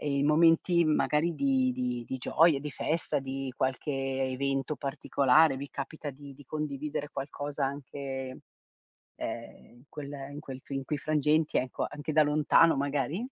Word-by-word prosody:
e 145 -2 -1
in 140 - +2
momenti 165 +2 +4
magari 155 +2 +2
di 265 - +2
di 125 - -2
di 130 - -4
gioie, 160 +4 +4
di 150 +1 -5
festa, 160 +2 -1
di 135 0 -4
qualche 130 +3 -1
evento 135 +1 -1
particolare, 140 +1 +3
vi 140 +1 -6
capita 145 +2 -5
di 140 0 -12
di 145 - -15
condividere 150 0 -4
qualcosa 140 +1 -3
anche, 140 +1 -5 1.2
ehm, - - -7
in 120 - -19
quel 145 -2 -7 0.2
in 145 - -7
quel 135 -3 -8
fi - - -8
in 135 - -2
quei 150 - -1
frangenti, 150 +1 +1
ecco, 130 0 -1
anche 145 +1 -5
da 155 0 +6
lontano 150 +2 +4
magari? 145 +4 -1
145 Hz, 160 wpm, -29 LUFS, 135-155 Hz, 1.2 s, da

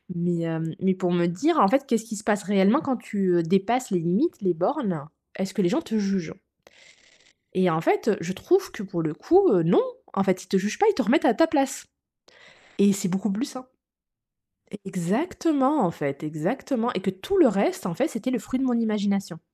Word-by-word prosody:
Mais 175 0 -1
hem, 160 -1 -3
mais 190 0 +2
pour 185 -2 -1
me 175 -1 +2
dire, 290 - +1
en 195 - +6
fait: 275 +5 +2
«Qu'est-ce 225 -3 0
qui 225 -1 -7
se 210 - -8
passe 210 -2 0
réellement, 200 +6 +3
quand 270 -4 -2
tu, 200 -5 -1
heu, 170 - +2
dépasses 205 +8 0
les 180 - +1
limites, 195 - 0
les 180 -3 +1
bornes? 185 - -2 0.3
Est-ce 190 +1 -4
que 210 - 0
les 175 - +2
gens 310 - 0
te 225 - -5
jugent?» 195 -5 -2 1.2
Et 185 -1 +3
en 160 -1 0
fait, 390 - +1
heu, 195 - +2
je 180 +2 -4
trouve 370 - +1
que, 215 - -8
pour 180 -4 -4
le 155 -2 -2
coup, 360 - +4
heu, 175 - +4
non, 170 - +4 0.3
en 195 - +1
fait, 185 -1 0
ils - - -18
te 195 - +1
jugent 205 +3 -2
pas, 415 - +4
ils - - +3
te 265 - +1
remettent 295 +9 +2
à 250 - +5
ta 325 +5 +3
place, 275 -4 -1 0.9
et 200 0 +6
c'est 200 +1 -2
beaucoup 195 +3 -1
plus 225 +8 -2
sain 255 -2 -10 1.2
exactement, 260 - 0
en 170 - 0
fait, 140 -2 -5
exactement, 220 - -2
et - - -2
que 195 - -1
tout 190 - -3
le 335 - +7
reste, 230 - 0
en 180 - -2
fait, 270 - -1
c'était 255 +1 -4
le 245 - -1
fruit 255 +5 -4
de 265 - 0
mon 245 - +1
imagination. 200 -5 -1
200 Hz, 225 wpm, -24 LUFS, 180-260 Hz, 1.2 s, le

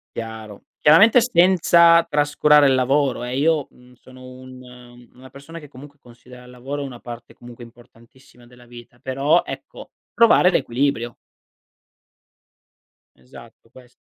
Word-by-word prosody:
Chiaro. 110 -2 -10 0.2
Chiaramente 210 +11 +5
senza 170 -5 +3
trascurare 145 0 +2
il 135 - +2
lavoro 135 0 -1
eh, 125 +2 -5
io, 155 -1 0
mhmm, 125 0 -23
sono 130 +1 -18
un 125 -1 -15
una 130 +1 -17
persona 160 +5 -13
che 150 - -15
comunque 145 +1 -16
considera 125 +1 -18
il 125 - -17
lavoro 135 +3 -8
una 125 -3 -10
parte 120 -1 -12
comunque 120 0 -14
importantissima 120 +1 -21
della 125 0 -20
vita, 120 0 -16
però 140 +6 -1
ecco, - - -11 0.2
trovare 230 -6 +3
l'equilibrio. 125 -4 -2 2.0
Esatto, 65 - -18
ques 125 0 -20
130 Hz, 130 wpm, -19 LUFS, 120-145 Hz, 2.0 s, Chiaramente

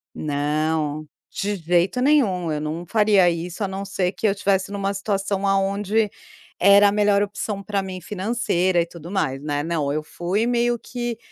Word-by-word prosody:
Não, 150 +1 -1 0.2
de 205 +1 -2
jeito 180 +7 +1
nenhum 205 - +2
eu 150 - -1
não 155 +3 -4
faria 205 -3 +4
isso 170 +4 -4
a - - 0
não 195 +1 -5
ser 185 -2 -1
que 215 - -1
eu - - +3
estivesse 195 -1 0
em - - -4
uma 200 0 -1
situação 200 0 -2
aonde 200 +2 +1 0.5
era 200 +2 +7
a - - 0
melhor 205 -1 +3
opção 205 0 -3
para 200 0 -1
mim 185 -1 -6
financeira 185 -3 0
e - - -1
tudo 170 0 -11
mais, 140 -9 -1
né. 145 -1 -2
Não, 155 -4 -1
eu 155 0 -2
fui 185 +8 -2
meio 240 -1 +1
que: 240 -2 -4
195 Hz, 180 wpm, -22 LUFS, 170-205 Hz, 0.5 s, era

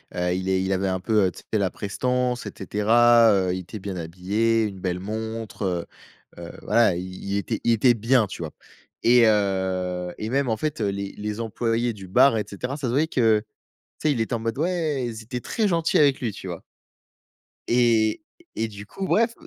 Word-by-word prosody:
heu, 90 0 0
il 95 +1 -3
est 95 -1 +2
il 95 - -1
avait 95 0 0
un 95 -1 -1
peu, 110 -2 +2
heu, 90 - +1
tu - - -13
sais, 110 - +1
la 95 -2 +1
prestance 125 +3 -2
et 105 - -5
cetera. 115 +4 +4
Heu, 95 -2 +1
il 95 - -3
était 95 +4 -8
bien 95 -1 -5
habillé, 100 +7 0
une 100 -3 -4
belle 90 -1 -2
montre, 110 +1 -5 0.7
heu, - - -9
heu, - - -7
voilà, 115 -6 +3
il 90 - -4 0.2
il 100 0 -1
était 110 +2 -2
il 120 - +4
était 120 +2 +4
bien, 115 +1 +2
tu 90 - -8
vois? 80 - -5 0.5
Et 120 0 +6
heu 95 -3 0
et 110 - -4
même 135 +1 +1
en 110 - +1
fait, 150 0 -3
heu 105 - 0
les, 100 0 -3
les 105 +2 -4
employés 115 +1 -1
du 95 -3 -10
bar 125 +4 +5
et 105 - -1
cetera, 125 +8 -4
ça 135 -4 -3
se - - -1
voyait 155 +4 +2
que 115 -7 +3 0.6
tu 155 - +1
sais - - +4
il 120 - -2
était 110 - -2
en - - 0
mode: 115 +3 -3
«Ouais!» 155 -6 0
ils 110 -1 -7
étaient 125 +1 -5
très 220 - -1
gentils 165 -3 +2
avec 140 -3 +4
lui, 120 -4 -1
tu 95 - -9
vois? 85 -2 -6 1.1
Et 115 - +3 0.3
et 115 - -1
du 105 -1 -10
coup, 190 - -6
ouais 230 +2 +3
f 230 - -16
110 Hz, 220 wpm, -24 LUFS, 95-120 Hz, 1.1 s, Et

